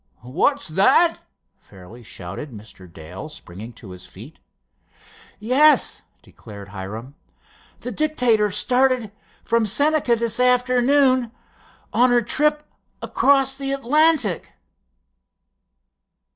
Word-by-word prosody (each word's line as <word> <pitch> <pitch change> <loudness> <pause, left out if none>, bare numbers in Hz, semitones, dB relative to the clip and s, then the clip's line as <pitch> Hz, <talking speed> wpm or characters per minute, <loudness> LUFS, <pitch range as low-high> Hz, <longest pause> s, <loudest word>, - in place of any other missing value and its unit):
"What's 190 - 0
that!" 200 - +3 0.4
fairly 100 +5 -15
shouted 100 +5 -8
Mr. 105 -5 -14
Dale, 85 - -10
springing 110 - -10
to 105 -4 -13
his 90 0 -11
feet. 115 +14 -14 1.0
"Yes," 265 +8 +2 0.2
declared 100 -3 -13
Hiram. 105 +7 -8 0.7
"The 250 - -6
Dictator 245 -6 +1
started 250 +1 0 0.3
from 230 -2 0
Senca 285 +1 +2
this 235 +1 0
afternoon—on 250 -1 0
her 245 0 +3
trip 300 +6 0 0.4
across 270 -1 +1
the 275 0 -4
Atlantic!" 275 - +1
235 Hz, 90 wpm, -21 LUFS, -, 1.0 s, that